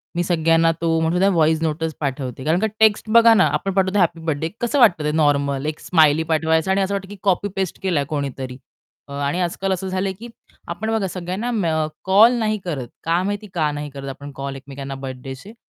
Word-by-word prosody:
मी 175 - +1
सगळ्यांना 165 -1 +3
तो 165 -1 +1
म्हणू 165 +2 +1
द्या 195 +1 +4
व्हॉइस 160 -3 +2
नोटंच 160 0 -1
पाठवते 135 -3 -4
कारण 165 +3 +2
का 220 - +1
टेक्स्ट 220 0 +3
बघा 230 0 +7
ना 195 - +5
आपण 195 -1 -1
पाठवतो 190 +1 +1
हॅपी 170 -2 +2
बर्थडे 160 +1 -1
कसं 240 +4 0
वाटतं 180 -10 +5
ते 150 - 0
नॉर्मल 140 -2 +1
एक 155 0 -3
स्माइली 160 -2 +3
पाठवायचं 160 +3 +2
आणि 195 - +2
असं 195 +1 -1
वाटतं 195 0 -4
की 205 - -8
कॉपी 200 0 +1
पेस्ट 190 -3 -3
केलाय 165 -7 +1
कोणीतरी. 135 -3 -4 0.5
अ, 140 - -10
आणि 145 +5 -2
आजकाल 190 +2 -2
असं 190 +1 -4
झालंय 190 +1 -2
की 235 - -8 0.4
आपण 215 +6 -4
बघा 215 -4 0
सगळ्यांना 185 +6 -4
मे 205 -8 0 0.4
कॉल 210 +6 +6
नाही 215 -1 0
करत 140 -9 -4 0.2
का 170 +2 +1
माहिती 205 +2 -3
का 155 -4 0
नाही 145 0 -5
करत 135 0 -8
आपण 140 +2 -8
कॉल 135 0 -5
एकमेकांना 135 0 -8
बर्थडेचे? 135 - -8
165 Hz, 205 wpm, -21 LUFS, 145-195 Hz, 0.5 s, बघा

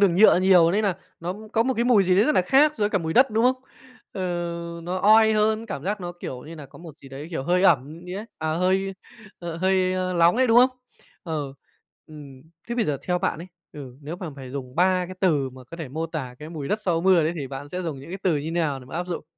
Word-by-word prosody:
đường 195 -4 +4
nhựa 200 -1 +6
nhiều 180 -3 +5
nên 210 +4 +1
nà 200 -4 +1 0.3
nó 175 +2 -3 0.2
có 225 - +3
một 260 +2 0
cái 235 - 0
mùi 240 -5 +5
gì 185 0 +3
đấy 205 - +5
rất 305 - +2
nà 185 - +4
khác 280 +9 +4
so 215 - -3
với 205 - +2
cả 200 - +1
mùi 160 -2 -3
đất, 260 +6 +5
đúng 220 +2 +1
không? 255 +1 +3 0.6
Ờ, 190 - -6 0.6
nó 180 +2 -3
oi 220 +3 +5
hơn, 215 +1 +1
cảm 195 -9 -6
giác 205 +2 -2
nó, 175 -1 -5
kiểu 125 -1 -6
như 160 +2 -10
nà, 150 - -10
có - - -16
một 165 -4 -12
gì 135 - -14
đấy, 135 +3 -8
kiểu, 160 -6 -3
hơi 180 +5 +1
ẩm 155 -3 +2
gì 180 - -6
đấy, 205 +3 -5
à 155 0 -1
hơi, 190 +3 0 0.4
ờ, 170 -1 -6
hơi, 185 0 +1
a, 185 0 -1
lóng 170 +1 +4
ấy, 260 +1 +3
đúng 230 0 +4
không? 255 +2 +7 0.5
Ừ, 150 -5 -4 0.5
ừm. 140 -4 -12 0.3
Thế 235 - -2
bây 235 -2 +1
giờ 150 -6 -1
theo 180 -1 +1
bạn 175 - -1
ấy, 170 - -8 0.3
ừ, 130 -4 -10
nếu 150 +4 -6
mà 180 -3 -6
phải 130 -2 -9
dùng 130 -2 -7
3 180 +1 +2
cái 185 - -8
từ 150 -8 +1
mà 130 0 -13
có 170 - -8
thể 160 -5 -6
mô 160 +5 -3
tả 140 -6 -6
cái 150 - -9
mùi 155 -4 -6
đất 210 - 0
sau 170 -4 0
mưa 185 -1 +4
đấy 155 +2 0
thì 140 - -4
bạn 135 +2 -8
sẽ 180 +4 -4
dùng 155 -6 -5
những 140 - -11
cái 190 - -5
từ 185 - +2
như 145 - -3
thế 160 - -3
nào 160 -5 -1
để - - -13
mà 130 - -11
áp 175 +1 -3
dụng? 175 - -5
175 Hz, 280 wpm, -24 LUFS, 150-195 Hz, 0.6 s, không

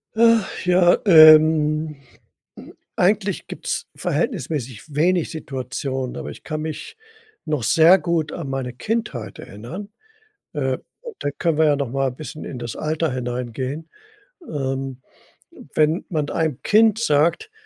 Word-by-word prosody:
Ach 230 -4 +3
ja, 180 -1 +5
ähm. 155 -2 +6 1.0
Eigentlich 195 0 +1
gibt's - - -4
verhältnismäßig 130 -1 -3
wenig 170 +3 +2
Situationen, 130 -2 -4
aber - - -6
ich - - -12
kann 155 -1 -4
mich 155 - -6 0.5
noch 150 -6 -2
sehr 165 - +6
gut 165 -1 -1
an 160 -6 -5
meine 135 -2 -3
Kindheit 125 - -4
erinnern. 155 - -9 0.6
Äh, 130 -4 -2 0.4
da 145 - -2
können 160 +1 -1
wir 160 - +4
ja 150 - +4
noch 140 -4 -2
mal 135 -1 0
'n 125 - -11
bisschen 155 +1 -8
in 125 - -7
das 120 -1 -6
Alter 155 0 -1
hineingehen. 125 +4 -4 0.6
Ähm, 135 -2 -4 0.7
wenn 155 +3 +2
man 155 -4 -2
einem 160 -5 -1
Kind 220 0 +4
sagt 165 - +1
155 Hz, 130 wpm, -21 LUFS, 130-170 Hz, 1.0 s, ähm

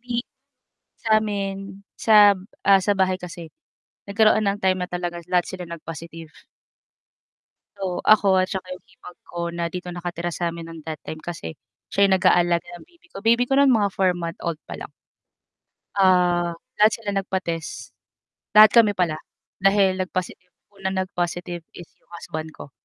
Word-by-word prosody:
di 240 0 -3 0.8
sa'min 200 -2 -1
sa 210 -2 +6 0.3
ah, 195 -1 +6
sa 205 - +2
bahay 185 -1 +3
kasi 175 -2 -9 0.6
nagkaroon 215 +1 +4
ng 200 - -2
time 185 -1 +2
na 180 - -3
talaga 175 -1 -4
lahat 180 -1 +2
sila 180 -2 -7
nag-positive. 165 -1 -9 1.4
So, 190 -3 -3
ako 200 -3 +5
at 185 - 0
saka 190 -2 -4
'yung 185 - -10
hipag 180 - -15
ko 175 - -6
na 170 0 -2
dito 180 +1 -7
nakatira 175 0 -4
sa'min 170 -1 -3
ng 165 -1 -9
that 155 -2 -5
time 155 - -7
kasi 165 - -6 0.4
siya 200 - +4
yung 190 - +4
nag-aalaga 175 -2 +3
ng - - -15
baby 345 0 -26
ko. - - -11
Baby 235 +2 +4
ko 270 - +2
nun 280 -1 +5
mga 210 -4 +3
4 190 -1 +3
month 170 -1 -5
old 170 -3 -3
pa - - -6
lang. - - -9 1.0
Ah, 180 -3 +3 0.2
lahat 215 +1 +6
sila 220 -3 -4
nagpa-test, 170 -8 -4 0.6
lahat 215 0 +9
kami 225 -3 +5
pala 170 -4 0 0.4
dahil 195 -1 +3
nag 185 0 -2
positive 180 0 -5 0.3
unang 190 0 -2
nag-positive 175 -2 -4 0.2
is 175 - -11
'yung - - -37
husband 160 -1 -6
ko 140 - -11
185 Hz, 160 wpm, -23 LUFS, 170-200 Hz, 1.4 s, lahat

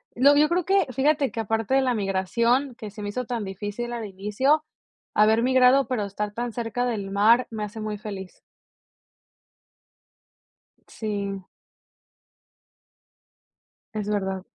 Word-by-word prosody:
lo 280 +4 +6
yo 300 +1 +5
creo 350 0 +1
que 390 +1 +3
fíjate 275 +2 +1
que, - - -5
aparte 225 +3 -1
de 270 - +5
la 255 -1 +1
migración 230 +6 0
que 220 -4 -8
se 210 +1 -9
me 205 - -3
hizo 250 +4 -3
tan 235 -2 -3
difícil 205 +5 -5
al 235 -2 -4
inicio, 210 +10 +1 0.5
haber 215 +2 +4
migrado, 260 +1 +5
pero 235 -5 -1
estar 205 +1 -4
tan 240 +2 -3
cerca 235 +1 -2
del 205 -5 -3
mar 225 +5 +4
me 220 -1 -4
hace 210 +2 -6
muy 215 -1 -4
feliz. 195 -3 -8 2.5
Sí. 200 -3 -4 2.5
Es 210 -1 -3
verdad. 190 -2 -2
225 Hz, 135 wpm, -25 LUFS, 205-250 Hz, 2.5 s, lo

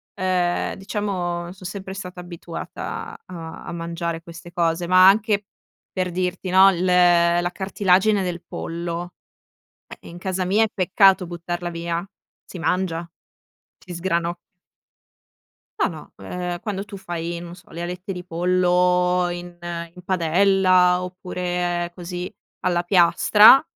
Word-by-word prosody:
ehm, 185 -2 0
diciamo, 180 -4 -3
son 185 0 -9
sempre 190 0 -6
stata 180 -2 -7
abituata 170 -1 -7
a 165 -3 -8
a - - -6
mangiare 170 0 -4
queste 170 0 -11
cose. 170 0 0
Ma 185 +1 +7
anche 205 0 +2 0.5
per 185 -1 -1
dirti, 185 +1 -2
no, 190 +1 +7
il 180 0 -2
la 175 -1 +4
cartilagine 195 +1 +2
del 175 -2 -3
pollo, 170 +1 -5 0.8
eh - - -12
in 170 - -10
casa 185 0 -2
mia 205 +5 +3
è - - -1
peccato 190 0 +4
buttarla 175 0 -4
via, 170 +2 -3 0.4
si 185 - -10
mangia, 170 -1 -1 0.7
si 180 - -10
sgranocchia. 170 -1 -1 1.4
No, - - +3
no, - - -11
ehm, 180 -1 -4
quando 200 -2 -3
tu 205 -2 -9
fai, 170 -2 -4
non 170 0 -9
so, 180 - -19
le 170 - -6
alette 180 +2 -5
di 180 -1 -7
pollo 180 +1 +2
in 175 0 -7
in 170 0 -7
padella 185 0 +3
oppure 180 -1 -3
così 180 0 -6 0.3
alla 175 -1 +1
piastra 205 - +7
180 Hz, 130 wpm, -22 LUFS, 175-185 Hz, 1.4 s, Ma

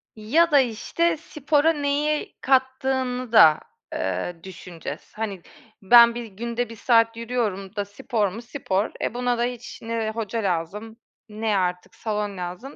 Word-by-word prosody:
Ya 300 +11 +2
da, 285 - +7
işte, 310 +8 0
spora 300 0 +1
neyi 295 +1 -1
kattığını 260 -2 0
da, 155 -9 +7 0.3
eee, 95 - -2
düşüneceğiz. 175 -4 -9
Hani 205 -4 -4 0.4
ben 235 +3 +7
bir 240 - -5
günde 235 +3 -4
1 230 - -9
saat 230 0 +3
yürüyorum 220 -5 -3
da 205 -1 -2
spor 205 +1 -1
mu 205 +5 -7
spor. 230 -5 -2
E, - - -1
buna 245 0 0
da 235 - 0
hiç 245 -1 -5
ne 225 -1 -2
hoca 225 0 -3
lazım, 195 +5 -3 0.3
ne 215 -1 -1
artık 180 -1 -2
salon 210 -3 -3
lazım. 180 +10 -6
230 Hz, 145 wpm, -24 LUFS, 200-250 Hz, 0.4 s, da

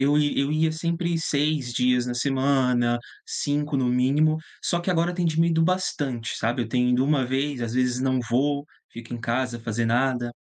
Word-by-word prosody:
eu 145 +2 +3
ia 145 -1 +1
eu 140 - 0
ia 155 +1 +1
sempre 170 +1 -1
6 150 -4 0
dias 125 0 +2
na 120 - -3
semana, 125 -2 +1 0.3
5 145 0 -2
no 130 - +1
mínimo. 140 +5 +2 0.3
Só 175 - 0
que 180 +2 -2
agora 175 0 +1
tem 175 -1 -1
diminuído 165 0 +2
bastante, 145 -9 -1
sabe. 120 +2 -1
Eu 115 - -6
tenho 125 +1 +1
ido 125 +2 +3
uma 140 -3 +2
vez, 135 +1 -2
às 115 - -3
vezes 125 -1 +1
não 130 -1 +1
vou, 140 +4 +1 0.3
fico 115 +1 -8
em 120 - -6
casa, 120 0 -2
fazer 115 0 -2
nada. 120 0 0
135 Hz, 190 wpm, -25 LUFS, 125-150 Hz, 0.3 s, eu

